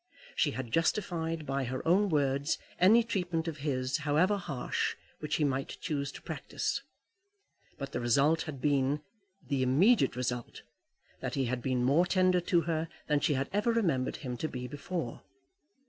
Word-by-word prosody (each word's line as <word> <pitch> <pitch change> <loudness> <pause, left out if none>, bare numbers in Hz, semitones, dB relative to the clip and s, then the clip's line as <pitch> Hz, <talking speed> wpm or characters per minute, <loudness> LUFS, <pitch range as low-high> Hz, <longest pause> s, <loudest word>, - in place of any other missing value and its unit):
She 155 - +3
had 130 -4 -5
justified 165 - 0
by 135 -1 -1
her 130 +4 -4
own 195 +4 +4
words 140 -1 +1 0.2
any 220 +6 +6
treatment 175 -7 -2
of 160 -2 -3
his, 130 -3 -1
however 155 +7 +2
harsh, 150 -10 -2 0.2
which 150 0 -2
he 155 - +1
might 135 -1 -1
choose 140 -5 -2
to - - -11
practise. - - -3 1.0
But 140 -1 -5
the - - -2
result 140 +7 +3
had 140 -3 -6
been 140 +1 +1 0.4
the 135 -1 0
immediate 160 - +4
result 125 -1 -3 0.6
that - - -3
he 135 -2 +1
had 125 +1 -2
been 125 -1 0
more 150 +8 +4
tender 185 -1 +3
to 175 -1 +2
her 165 -1 -1 0.2
than 150 -1 +2
she 145 - +1
had 135 +1 -1
ever 210 +3 +2
remembered 170 - +1
him 125 -1 -3
to 155 - -2
be 125 -3 -5
before. 145 -1 -4
150 Hz, 165 wpm, -31 LUFS, 130-170 Hz, 1.0 s, any